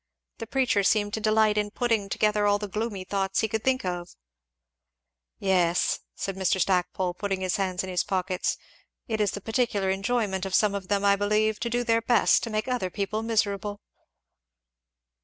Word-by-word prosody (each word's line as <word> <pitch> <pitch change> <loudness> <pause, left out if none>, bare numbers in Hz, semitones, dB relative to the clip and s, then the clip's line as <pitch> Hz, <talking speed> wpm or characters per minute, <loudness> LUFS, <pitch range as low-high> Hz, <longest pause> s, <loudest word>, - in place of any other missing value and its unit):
The 225 - -6
preacher 255 -6 +2
seemed 205 +1 +2
to - - -1
delight 215 0 +3
in 210 0 -1
putting 225 -3 0
together 210 0 +1
all 205 0 +3
the 210 0 -5
gloomy 210 -1 -3
thoughts 195 0 -1
he 220 - +1
could 220 0 -3
think 260 -5 +1
of." 175 -1 -3 1.3
"Yes!" 180 -3 +1 0.2
said 195 - -4
Mr. 190 0 +1
Stackpole, 180 -1 0
putting 195 +1 -3
his 185 -2 0
hands 185 -2 -1
in 190 - -6
his 180 - +1
pockets, 185 -1 -1 0.5
"it 220 -3 -1
is 205 - +2
the 205 - -5
particular 220 -3 0
enjoyment 195 -1 -1
of 190 -2 -1
some 210 -2 +3
of 195 -2 -4
them, 200 0 0
I 200 0 +5
believe, 210 +1 +1
to 235 - -2
do 240 +1 0
their 230 -1 +2
best 240 +1 +4
to 230 - -4
make 215 +1 -2
other 250 -7 -1
people 205 +3 -2
miserable." 205 -2 -1
205 Hz, 180 wpm, -26 LUFS, 190-220 Hz, 1.3 s, I